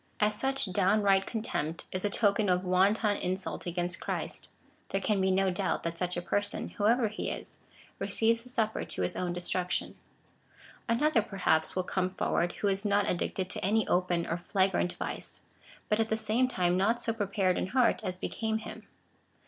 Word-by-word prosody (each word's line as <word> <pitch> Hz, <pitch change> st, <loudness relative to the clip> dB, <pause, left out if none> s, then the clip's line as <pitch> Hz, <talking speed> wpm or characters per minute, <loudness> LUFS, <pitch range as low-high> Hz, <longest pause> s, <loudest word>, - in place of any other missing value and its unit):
As 210 Hz, 0 st, +3 dB
such 270 Hz, +4 st, +1 dB
dow^nright 195 Hz, 0 st, +3 dB
contempt 170 Hz, -8 st, -3 dB
is 185 Hz, -, -1 dB
a 205 Hz, -, +2 dB
token 205 Hz, -1 st, +2 dB
of 180 Hz, +1 st, +2 dB
wanton 200 Hz, +3 st, +3 dB
insult 185 Hz, 0 st, -3 dB
against 175 Hz, +1 st, -2 dB
Christ, -, -, -3 dB, 0.4 s
there 195 Hz, -, 0 dB
can 200 Hz, 0 st, +1 dB
be 190 Hz, -, +2 dB
no 190 Hz, 0 st, +2 dB
doubt 185 Hz, +1 st, -1 dB
that 170 Hz, 0 st, -2 dB
such 180 Hz, +1 st, -2 dB
a 175 Hz, -, -3 dB
person, 205 Hz, +3 st, -1 dB
whoever 225 Hz, +3 st, +2 dB
he 215 Hz, -, -4 dB
is, -, -, -7 dB, 0.4 s
receives 230 Hz, +1 st, +2 dB
the 250 Hz, -, -9 dB
Supper 220 Hz, -3 st, -1 dB
to 90 Hz, -, -3 dB
his 90 Hz, -, -1 dB
own 180 Hz, -1 st, -1 dB
desti 180 Hz, +1 st, 0 dB
uction. 180 Hz, -, -2 dB, 1.0 s
Another, 240 Hz, +1 st, +3 dB
perhaps, 185 Hz, -6 st, +1 dB
Avill 185 Hz, -1 st, -1 dB
come 185 Hz, 0 st, 0 dB
forward, 175 Hz, -1 st, 0 dB
who 205 Hz, -, -2 dB
is 195 Hz, 0 st, 0 dB
not 205 Hz, -1 st, +2 dB
addicted 185 Hz, +1 st, -1 dB
to -, -, -4 dB
any 215 Hz, +2 st, +2 dB
open 175 Hz, -1 st, +1 dB
or 165 Hz, -, -2 dB
flagrant 185 Hz, 0 st, +1 dB
vice, -, -, -5 dB, 0.5 s
but 210 Hz, -, +1 dB
at 225 Hz, 0 st, +1 dB
the 220 Hz, -, +1 dB
same 220 Hz, +4 st, +2 dB
time 180 Hz, -7 st, +1 dB
not 215 Hz, +6 st, +2 dB
so 230 Hz, -1 st, -1 dB
prepared 200 Hz, -4 st, 0 dB
in -, -, -1 dB
heart 245 Hz, +1 st, +2 dB
as 185 Hz, -2 st, -3 dB
became 220 Hz, +3 st, -2 dB
him. 220 Hz, -, -9 dB
195 Hz, 185 wpm, -30 LUFS, 180-220 Hz, 1.0 s, As